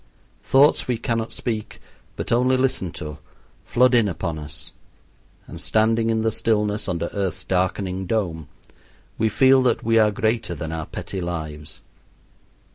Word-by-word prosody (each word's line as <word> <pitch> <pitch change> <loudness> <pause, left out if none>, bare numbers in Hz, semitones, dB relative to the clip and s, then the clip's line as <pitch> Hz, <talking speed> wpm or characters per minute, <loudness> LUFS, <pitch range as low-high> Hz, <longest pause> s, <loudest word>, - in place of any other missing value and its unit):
Thoughts 140 +3 +4
we 125 -2 0
cannot 115 0 -2
speak 110 -4 -4 0.4
but - - -5
only 125 +2 +3
listen 130 -9 0
to 75 -1 -7 0.4
flood 125 +1 +3
in 115 -3 +5
upon 85 -3 -3
us, 75 -1 -7 0.7
and - - -7
standing 115 +1 +2
in 110 -1 +1
the 110 - +2
stillness 105 -2 0
under 85 -1 -2
earth's 95 -4 -2
darkening 95 0 -1
dome, 85 -8 -1 0.7
we 110 - +3
feel 130 +5 +5
that 125 -3 +1
we 115 0 +3
are 110 -1 +5
greater 110 -2 -1
than 80 -1 -5
our 80 -1 -4
petty 95 - -5
lives. 80 -3 -5
105 Hz, 145 wpm, -23 LUFS, 85-115 Hz, 0.7 s, in